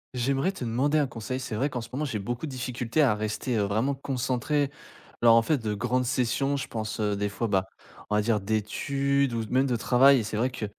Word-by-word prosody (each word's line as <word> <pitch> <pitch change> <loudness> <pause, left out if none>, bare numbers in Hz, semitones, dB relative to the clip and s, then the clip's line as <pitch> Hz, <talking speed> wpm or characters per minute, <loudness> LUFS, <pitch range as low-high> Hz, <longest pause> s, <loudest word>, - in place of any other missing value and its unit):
J'aimerais 135 +8 +1
te 130 - -6
demander 135 +7 +1
un 145 - +3
conseil, 125 +1 -5
c'est 115 -3 -6
vrai 135 +7 0
qu'en 125 -3 -4
ce 115 - -9
moment 145 - -2
j'ai 130 -8 -2
beaucoup 120 +9 -4
de - - -7
difficultés 125 +2 -1
à 130 -6 +4
rester, 110 +3 -2
heu, - - +2
vraiment 110 +8 0
concentré, 135 +1 -1 0.5
lors 115 -1 +7
en 115 - +5
fait 150 +4 +1
de 110 -2 -2
grandes 125 +4 0
sessions, 130 +3 0
je 135 - -4
pense, 110 -1 -4
heu, 105 -1 +1
des 100 0 -1
fois, 100 +4 -3
bah, 95 -2 +1 0.4
on 105 - +1
va 105 - +3
dire 110 -1 +2
d'études 135 +6 0
ou 115 -1 -1
de - - -11
z - - -15
même 130 +2 +3
de 125 - +1
travail 130 +4 +5
et - - -2
c'est 105 - -4
vrai 120 +4 +1
que, 125 -4 -5
125 Hz, 250 wpm, -27 LUFS, 110-135 Hz, 0.5 s, lors